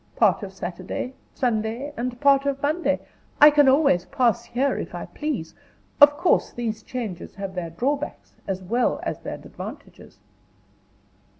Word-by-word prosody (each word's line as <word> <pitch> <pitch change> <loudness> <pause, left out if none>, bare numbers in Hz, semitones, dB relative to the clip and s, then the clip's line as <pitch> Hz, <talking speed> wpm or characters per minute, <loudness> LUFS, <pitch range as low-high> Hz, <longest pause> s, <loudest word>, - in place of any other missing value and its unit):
Part - - +3
of 200 -2 -6
Saturday, 185 +7 -5 0.2
Sunday, 240 +3 -1
and 245 -1 -4
part 280 -1 +4
of 275 -1 0
Monday, 305 +5 0 0.4
I 295 +1 +10
can 290 -2 +5
always 270 - +4
pass 235 -2 +1
here, 270 +3 0
if - - -6
I - - -5
please. 285 - -4 0.5
Of 290 0 +8
course 350 +2 +2
these 225 -2 -4
changes 220 -9 -6
have 195 0 -5
their 180 -2 -4
drawbacks, 275 - -3
as 190 -1 -3
well 235 +7 +1
as - - -3
their - - -5
advantages." - - -10
245 Hz, 145 wpm, -24 LUFS, 200-280 Hz, 0.5 s, I